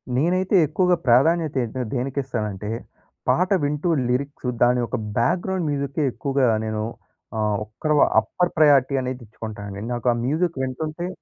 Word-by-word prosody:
నేనైతే 180 +8 +1
ఎక్కువగా 180 +4 +2
ప్రాధాన్యత 155 +6 +4
ఏంటంటే 120 +1 -4
దేనికిస్తానంటే 120 -6 -3 0.6
పాట 180 +2 +3
వింటూ 150 +4 0 0.2
లిరిక్సు 135 0 -2
దాని 125 +1 +4
యొక్క - - -2 0.2
బ్యాక్‌గ్రౌండ్ 175 +8 0
మ్యూజికే 140 +1 -1
ఎక్కువగా 135 -2 0 0.2
నేను 110 -1 -2 0.5
ఆహ్, 105 -1 +1
ఒక్కరు 150 +8 -2 0.2
అప్పర్ 180 -1 -1
ప్రయారిటీ 140 -3 +5
అనేదిచ్చుకుంటానండి. 110 -5 -6
నాకా 120 0 +1
మ్యూజిక్ 155 +2 0
వింటుంటే 155 +6 -3
135 Hz, 120 wpm, -23 LUFS, 120-155 Hz, 0.6 s, ప్రయారిటీ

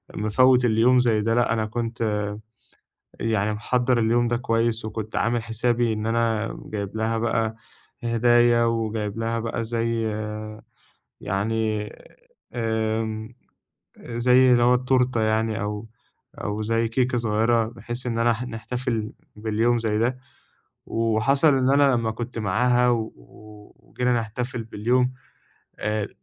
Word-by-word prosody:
مفوِّت 125 +4 +3
اليوم 120 +3 +4
زيّ 115 -3 +2
ده. 115 +2 +1
لأ، 120 -1 +2
أنا 110 -1 0
كنت 115 +1 -4 1.2
يعني 110 -2 0
محضِّر 125 +3 +1
اليوم 120 +1 +2
ده 120 - +1
كويس، 115 -1 0
وكنت 110 0 -5
عامل 120 0 +1
حسابي 115 +1 0
إن 110 0 -3
أنا 115 -1 0
جايبها 110 +2 -2
بقى 110 -1 0 0.5
هدايا، 120 0 +4
وجايبها 115 0 -1
بقى 115 0 -3
زيّ 115 0 -1 1.2
يعني، 105 +2 -1 0.6
آمم، 110 0 -2 0.7
زيّ 125 +2 +4
اللي 120 -1 +4
هو 125 +1 +5
التورتة 125 -1 +1
يعني، 110 0 0
أو 105 +1 -4 0.5
أو 105 +1 -4
زيّ 115 +1 0
كيكة 125 +2 0
صغيِّرة، 115 0 +1
بحيث 120 +2 -7
إن 115 -1 -1
أنا 120 0 +3
ح 115 +2 -5
نحتفل 115 -2 -4 0.2
باليوم 110 +3 +1
زيّ 110 -2 -1
ده. 125 +3 0 0.7
وحصل 130 +6 +2
إن 130 0 +2
أنا 140 -1 +4
لمّا 115 -2 0
كنت 120 +1 -6
معاها 125 +4 +2
و 115 -2 -1 0.7
وجينا 125 0 -1
نحتفل 120 +1 -3
باليوم، 125 +4 0 0.7
آآ، 105 -1 -1
115 Hz, 125 wpm, -24 LUFS, 110-120 Hz, 1.2 s, هو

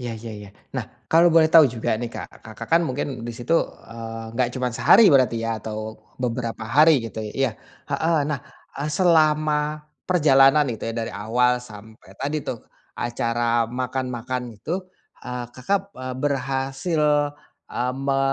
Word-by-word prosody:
Iya 120 -2 -4
iya 115 0 -8
iya. 105 -1 -10 0.3
Nah, - - -2 0.3
kalau 170 +1 +6
boleh 160 -1 +6
tahu 160 -2 +8
juga 110 -1 -1
nih 115 +1 -4
Kak, - - -9
Kakak 110 -1 -9
kan 170 - +6
mungkin 130 -4 -3
di 120 - -4
situ, 125 +8 0 0.3
eee, 115 0 -8
enggak 125 -1 +1
cuman 125 -2 -2
sehari 135 - +6
berarti 130 -3 +4
ya, 115 -2 -3
atau, 110 0 -5 0.2
beberapa 120 -2 -3
hari 150 +4 +5
gitu 110 - -8
i 105 - -5
iya, - - +1 0.4
heeh. 165 0 +1
Nah, 150 -3 -2 0.4
eee, 150 +2 -2
selama, 155 -3 +2 0.3
perjalanan 145 -4 +5
itu 115 - -5
ya, - - -6
dari 115 - -3
awal 125 +4 +1
sampai 110 -3 -14
tadi 145 +2 -2
tuh, 120 - -4 0.4
acara 120 -1 0
makan-makan 125 0 -3 0.2
itu, 160 - -3 0.5
eee, 125 -1 -5
kakap, 195 +10 -2
eee, 130 0 -6
berhasil, 135 +3 -1 0.7
eee, 125 +1 -1
me 135 0 0
125 Hz, 155 wpm, -23 LUFS, 115-150 Hz, 0.7 s, tahu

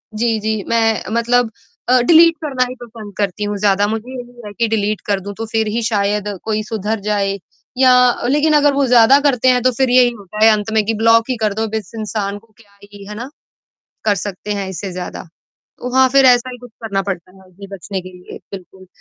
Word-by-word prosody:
जी, 225 0 0
जी, 215 -1 -2
मैं 225 -1 +1
मतलब 235 0 +1 0.4
अ, 255 0 +5
डिलीट 330 +5 +6
करना 265 -4 0
ही 255 - -7
पसंद 220 -3 -11
करती 200 0 -2
हूँ 205 0 -2
ज़्यादा 200 0 +2
मुझे 225 +3 -4
ये 245 -4 -9
कि 230 - +2
डिलीट 215 -1 -1
कर 200 -1 +1
दूँ 200 +2 -7
तो 225 - -4
फिर 220 0 -1
ही 230 +3 -2
शायद 210 -2 0 0.2
कोई 215 -1 -1
सुधर 215 0 -3
जाए 200 -1 0 0.4
या 260 -1 +5 0.4
लेकिन 295 +3 +2
अगर 290 -1 +4
वो 275 0 +1
ज़्यादा 245 +3 +6
करते 265 -4 +1
हैं 250 -1 +3
तो 255 - +3
फिर 265 -1 +2
यही 250 0 +5
होता 210 +2 -4
है 225 - +7
अंत 215 0 -1
में 220 -1 +3
कि 225 - 0
ब्लॉक 230 +2 +3
ही 255 - 0
कर 210 -2 +1
दो 220 +2 -2
अब 215 - -12
इस 215 -5 -5
इंसान 205 -2 -3
को 220 +1 -29
क्या 205 -3 -23
ही 200 0 -13
है 210 - -8
ना? 240 +5 -7 0.8
कर 205 - +3
सकते 205 +1 -5
हैं 200 -1 -4
इससे 190 +1 -6
ज़्यादा। 180 0 -6 0.4
तो 250 +1 -9
हाँ, 260 0 +5
फिर 275 +1 +4
ऐसा 250 0 +4
ही 245 - -9
कुछ 245 0 -13
करना 195 -3 -2
पड़ता 185 -2 -5
है - - -18
हमें 190 +2 -14
बचने 190 +1 -5
के 185 - -11
लिए 180 - -11
बिल्कुल। 190 0 -11
220 Hz, 225 wpm, -17 LUFS, 205-245 Hz, 0.8 s, है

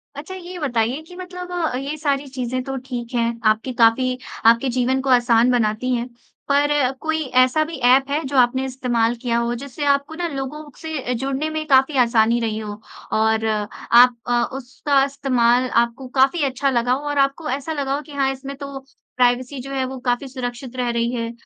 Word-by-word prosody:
अच्छा 310 +7 -7
ये 365 0 -8
बताइए 245 -1 0
कि 360 - -12
मतलब 360 0 -8 0.3
ये 280 +3 -4
सारी 285 -2 -1
चीज़ें 255 -1 -3
तो 270 0 -5
ठीक 245 -2 -6
हैं, 235 0 0
आपकी 220 +4 +2
काफ़ी 250 +2 +3 0.3
आपके 235 +3 +5
जीवन 255 +2 +1
को 270 - -3
आसान 240 -1 +4
बनाती 240 +1 +1
हैं। 240 0 -3 0.4
पर 285 +1 +3 0.3
कोई 315 0 -1 0.2
ऐसा 310 +5 +2
भी 320 0 -7
ऐप 265 +2 +5
है 295 +3 0
जो 270 0 -2
आपने 255 +2 +3
इस्तेमाल 240 -3 0
किया 235 -2 0
हो, 235 0 0
जिससे 280 +3 -5
आपको 280 +2 +1
ना 345 +1 -2
लोगों 295 +1 -6
से 305 -6 -3
जुड़ने 270 +5 -2
में 310 0 -3
काफ़ी 270 +1 +4
आसानी 230 0 +3
रही 220 -2 -2
हो, 210 -1 -7 0.3
और 220 0 +2
आप 230 +3 +3
अ, 240 -1 +2
उसका 270 +2 0
इस्तेमाल 255 -3 +1
आपको 235 +3 -7
काफ़ी 275 +4 +4
अच्छा 275 +1 0
लगा 245 -1 +1
हो 285 +3 -3
और 290 - -2
आपको 275 +3 0
ऐसा 280 +4 -3
लगा 275 -2 -1
हो 290 - -3
कि 300 - -15
हाँ, 270 -1 +1
इसमें 270 +1 -7
तो 280 -1 -7 0.4
प्राइवेसी 250 +2 +1
जो 275 - -8
है, 265 -1 0
वो 260 0 -6
काफ़ी 245 +2 -1
सुरक्षित 250 -1 -6
रह 250 -1 -1
रही 235 0 0
है। 230 -1 -3
260 Hz, 195 wpm, -21 LUFS, 240-280 Hz, 0.4 s, आपके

